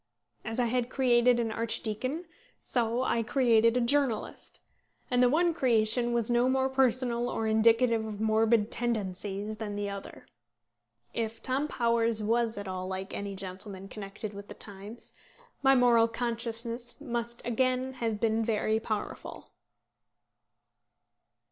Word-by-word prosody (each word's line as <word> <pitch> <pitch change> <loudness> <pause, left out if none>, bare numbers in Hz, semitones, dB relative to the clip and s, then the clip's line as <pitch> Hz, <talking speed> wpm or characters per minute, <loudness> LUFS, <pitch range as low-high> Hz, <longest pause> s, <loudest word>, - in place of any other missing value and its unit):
As 225 +1 -3
I 245 - +3
had 240 +1 0
created 245 -2 +3
an 230 -2 -1
archdeacon, 230 +7 -1 0.3
so 240 0 -1
had - - +1
I - - +2
created 230 -1 +3
a - - +2
journalist, 260 -2 0 0.5
and 245 0 +3
the 250 - +5
one 335 +5 +2
creation 240 -3 +2
was 235 -2 0
no 240 +1 +2
more 265 0 +1
personal 250 -2 +1
or 225 - -2
indicative 225 +1 +3
of 210 -2 -6
morbid 220 0 +2
tendencies 210 -2 -2
than 210 -2 -5
the 205 0 -3
other. 200 -1 -9 0.9
If 225 -1 -3
Tom 270 +3 0
Towers 230 -4 +2
was 230 0 +1
at 205 -1 -5
all 185 0 -4
like 190 +1 -5
any 200 -1 -4
gentleman 190 +1 -6
then 195 - -11
connected 210 +1 -7
with 200 0 -9
the - - -10
Times, 205 +3 -10 0.5
my 270 -1 +5
moral 240 -2 +5
consciousness 235 +1 -3
must 235 -4 -4
again 255 +2 0
have 230 -4 -2
been 225 0 +1
very 220 -1 0
powerful. 215 -2 -5
230 Hz, 140 wpm, -29 LUFS, 215-245 Hz, 0.9 s, the